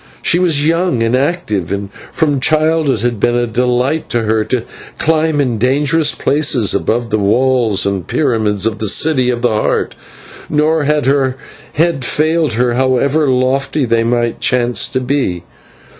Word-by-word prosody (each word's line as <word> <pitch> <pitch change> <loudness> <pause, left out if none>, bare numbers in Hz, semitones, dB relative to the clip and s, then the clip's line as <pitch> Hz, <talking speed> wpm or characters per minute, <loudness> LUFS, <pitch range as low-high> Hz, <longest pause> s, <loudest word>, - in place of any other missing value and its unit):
She 175 - +2
was 160 -5 +2
young 165 -6 +1
and 115 +2 +1
active, 130 - -2
and 100 0 -3 0.2
from 150 -4 0
childhood 155 0 +1
it 110 - -4
had 120 -3 -1
been 120 +3 +1
a 120 0 +1
delight 125 +6 -1
to 120 - 0
her 110 0 +1
to 125 -3 -2 0.3
climb 160 -1 +1
in 125 -6 -1
dangerous 145 +5 +1
places 140 -7 +1
about 115 +1 -1
the 110 - +1
walls 115 0 +2
and 100 -3 -2
pyramids 110 -8 0
of 110 -1 -2
the 110 - -1
City 130 0 +2
of 120 -1 -2
the 120 - +3
Heart, 110 -1 -1 0.6
nor 150 0 +1
had 150 -1 +1
her 135 -1 +1 0.4
head 160 -3 0
failed 155 +1 0
her 120 +1 0
however 130 +4 +1
lofty 135 +2 0
they 115 -1 +1
might 120 0 -1
chance 125 -1 +1
to 130 - -2
be. 125 -10 -2
130 Hz, 165 wpm, -14 LUFS, 115-150 Hz, 0.6 s, the